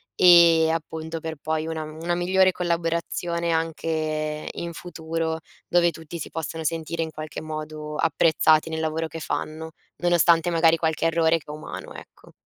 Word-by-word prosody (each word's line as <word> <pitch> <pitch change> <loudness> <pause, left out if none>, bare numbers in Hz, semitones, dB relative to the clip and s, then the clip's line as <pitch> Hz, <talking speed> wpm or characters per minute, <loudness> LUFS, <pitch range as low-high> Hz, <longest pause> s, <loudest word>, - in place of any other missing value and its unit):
e 170 -2 +7
appunto 160 0 -4
per 160 0 -6
poi 155 0 -1
una 160 -1 -3
una 160 +3 -4
migliore 185 +2 +3
collaborazione 170 0 -1
anche 155 -2 -2
in 170 0 -6
futuro, 160 -1 -4 0.3
dove 175 -1 +4
tutti 165 +1 -9
si - - -6
possono 160 0 -5
sentire 165 +1 -2
in 160 - -2
qualche 155 0 -7
modo 155 -1 -6
apprezzati 160 0 +3
nel 160 0 -3
lavoro 160 +1 -1
che 165 +1 -7
fanno, 155 +2 -4 0.3
nonostante 175 -1 +4
magari 165 -1 +4
qualche 160 0 0
errore 165 0 +2
che - - -22
è - - -6
umano, 155 +1 -8
ecco. - - -14
160 Hz, 155 wpm, -24 LUFS, 155-170 Hz, 0.3 s, e